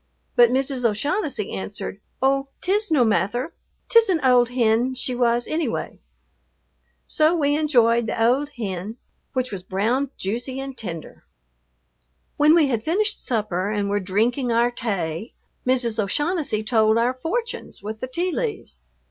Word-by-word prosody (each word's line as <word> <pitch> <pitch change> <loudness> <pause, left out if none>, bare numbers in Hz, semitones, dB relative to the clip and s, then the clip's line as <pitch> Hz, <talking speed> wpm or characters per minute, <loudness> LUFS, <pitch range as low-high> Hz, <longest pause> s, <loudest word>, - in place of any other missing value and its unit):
But 240 -2 +7
Mrs. 265 0 -1
O'Shaughnessy 250 - -1
answered, 95 - -5 0.2
"Oh, 275 +1 +2
't 370 - -1
is 420 +1 0
no 285 -7 +4
mather, 220 - 0 0.3
't 460 - +7
is 450 -3 0
an 350 -4 +2
ould 245 -2 +5
hin 245 +1 +2
she 255 0 -2
was 240 -1 +1
annyway." 310 -7 -3 1.1
So 315 +2 +2
we 290 -3 +2
enjoyed 235 -7 +3
the - - -3
"ould 255 +6 +2
hin," 205 -1 -4 0.4
which 255 -1 -1
was 195 -3 -5
brown, 225 +9 0
juicy, 240 +7 -3
and 270 -1 -6
tender. 175 -9 -8 1.1
When 300 +2 +5
we 330 -3 +5
had 235 -5 -1
finished 415 - +1
supper 205 -5 -1
and 205 -1 -1
were 205 - +1
drinking 230 +7 0
our 235 +1 +3
"tay," 195 -4 -3 0.3
Mrs. 240 -4 +2
O'Shaughnessy 295 - -1
told 220 -1 +3
our 240 +2 +2
fortunes 420 - -4
with 215 +1 -5
the 255 - -4
tea 345 +8 -1
leaves. 435 +2 -4
245 Hz, 150 wpm, -23 LUFS, 215-285 Hz, 1.1 s, But